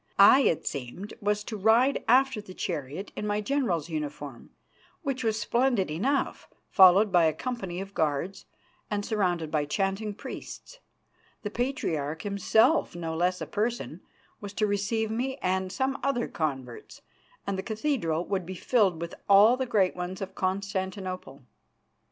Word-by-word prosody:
I, 200 Hz, +7 st, +8 dB
it 170 Hz, -, +1 dB
seemed, 140 Hz, -, -5 dB
was 210 Hz, 0 st, 0 dB
to 220 Hz, -, -6 dB
ride 225 Hz, +7 st, +3 dB
after 260 Hz, -1 st, +4 dB
the 185 Hz, -3 st, -12 dB
chariot 155 Hz, +2 st, -4 dB
in 210 Hz, -, -3 dB
my 205 Hz, 0 st, 0 dB
general's 210 Hz, -, 0 dB
uniform, 150 Hz, -5 st, -6 dB, 0.5 s
which 270 Hz, -3 st, -2 dB
was 220 Hz, -1 st, 0 dB
splendid 235 Hz, -5 st, +1 dB
enough, 265 Hz, -, -1 dB, 0.2 s
followed 195 Hz, +2 st, +7 dB
by 175 Hz, -2 st, +5 dB
a 160 Hz, -, +3 dB
company 195 Hz, -8 st, -4 dB
of 195 Hz, +1 st, -7 dB
guards, 160 Hz, +4 st, -1 dB, 0.4 s
and 205 Hz, -1 st, -2 dB
surrounded 180 Hz, -8 st, 0 dB
by 150 Hz, -2 st, +1 dB
chanting 195 Hz, +6 st, -1 dB
priests. -, -, -9 dB, 0.6 s
The 210 Hz, -, -3 dB
Patriarch 160 Hz, -, -2 dB
himself, 205 Hz, -, +2 dB
no 165 Hz, -2 st, -4 dB
less 180 Hz, +2 st, 0 dB
a -, -, -2 dB
person, 230 Hz, +3 st, -3 dB, 0.4 s
was 205 Hz, -1 st, -8 dB
to 215 Hz, -, +1 dB
receive 210 Hz, +2 st, 0 dB
me 260 Hz, +4 st, -2 dB
and 185 Hz, -2 st, -1 dB
some 265 Hz, +7 st, -1 dB
other 250 Hz, -3 st, 0 dB
converts, 135 Hz, -6 st, -5 dB, 0.4 s
and 200 Hz, -, -1 dB
the 190 Hz, -, -2 dB
cathedral 215 Hz, -, -1 dB
would 195 Hz, -2 st, -1 dB
be 185 Hz, +2 st, -7 dB
filled 195 Hz, -5 st, +2 dB
with 170 Hz, 0 st, -5 dB, 0.2 s
all 205 Hz, +4 st, +7 dB
the 260 Hz, 0 st, -2 dB
great 195 Hz, -6 st, +2 dB
ones 180 Hz, +1 st, -5 dB
of 190 Hz, -1 st, -6 dB
Constantinople. 190 Hz, -6 st, -3 dB
195 Hz, 150 wpm, -28 LUFS, 175-225 Hz, 0.6 s, I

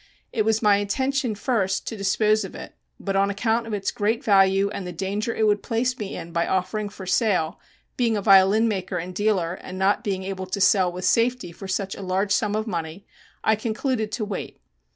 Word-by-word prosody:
It 215 Hz, -3 st, +1 dB
was 220 Hz, +1 st, +1 dB
my 205 Hz, -1 st, +5 dB
intention 260 Hz, +4 st, -1 dB
first 200 Hz, -5 st, 0 dB
to 225 Hz, -, -4 dB
dispose 215 Hz, +2 st, +2 dB
of 190 Hz, -, -8 dB
it, -, -, -9 dB, 0.3 s
but 195 Hz, -1 st, -3 dB
on 195 Hz, +1 st, +3 dB
account 225 Hz, +3 st, 0 dB
of 225 Hz, -, -5 dB
its 195 Hz, -1 st, -2 dB
great 225 Hz, 0 st, -1 dB
value 195 Hz, -1 st, +4 dB
and 190 Hz, -3 st, -5 dB
the -, -, -4 dB
danger 200 Hz, +6 st, -3 dB
it 220 Hz, -, +2 dB
would 205 Hz, -1 st, +2 dB
place 250 Hz, +2 st, -1 dB
me 205 Hz, -2 st, -5 dB
in 170 Hz, -, -7 dB
by 170 Hz, 0 st, 0 dB
offering 205 Hz, +3 st, -1 dB
for 200 Hz, -1 st, -10 dB
sale 185 Hz, -4 st, +1 dB, 0.4 s
being 230 Hz, -3 st, +2 dB
a -, -, -2 dB
violin 195 Hz, +3 st, +6 dB
maker 190 Hz, -3 st, -2 dB
and 180 Hz, +2 st, -5 dB
dealer 185 Hz, -4 st, 0 dB
and 185 Hz, 0 st, -8 dB
not 200 Hz, +3 st, +2 dB
being 195 Hz, -4 st, -2 dB
able 190 Hz, -1 st, -5 dB
to 190 Hz, +2 st, -3 dB
sell 190 Hz, -2 st, +4 dB
with 180 Hz, +1 st, -5 dB
safety 235 Hz, -5 st, +1 dB
for 190 Hz, +3 st, -9 dB
such 195 Hz, 0 st, -2 dB
a -, -, -8 dB
large 190 Hz, +2 st, -1 dB
sum 210 Hz, 0 st, +1 dB
of 215 Hz, 0 st, -1 dB
money 170 Hz, -2 st, -5 dB, 0.4 s
I 220 Hz, -, +4 dB
concluded 220 Hz, 0 st, -2 dB
to 215 Hz, -2 st, -2 dB
wait. 205 Hz, -2 st, -6 dB
200 Hz, 215 wpm, -24 LUFS, 190-220 Hz, 0.4 s, violin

